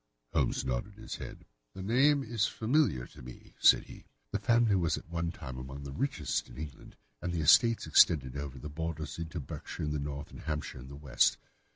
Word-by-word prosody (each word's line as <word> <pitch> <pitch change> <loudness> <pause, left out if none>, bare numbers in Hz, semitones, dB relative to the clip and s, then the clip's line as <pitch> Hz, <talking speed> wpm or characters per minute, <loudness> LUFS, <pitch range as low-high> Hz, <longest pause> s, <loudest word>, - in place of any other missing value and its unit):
Holmes - - +1
nodded 65 +12 -2
his 110 +1 -7
head. - - -9 0.3
"The 95 - -6
name 135 +7 +4
is 110 -3 0
familiar 110 - +1
to - - -14
me," 60 0 -12
said - - +7
he. - - -13 0.3
"The - - -1
family 115 -3 +3
was 85 -5 +1
at - - -10
one 85 0 -2
time 65 -7 -8
among 65 +2 -7
the 70 - -6
richest 75 - -1
in - - -12
England, 75 -4 -8 0.3
and 90 - -2
the 85 -2 -1
estates 115 +9 +5
extended 65 -6 +5
over 70 -2 -5
the 70 - -7
borders 80 +1 -4
into 85 +1 -4
Berkshire 75 +3 -6
in 75 - -1
the 75 - -1
north, 70 0 -5
and - - -10
Hampshire 75 -4 -4
in 65 - -10
the 70 - -9
west. 70 -3 +2
80 Hz, 205 wpm, -31 LUFS, 70-100 Hz, 0.3 s, said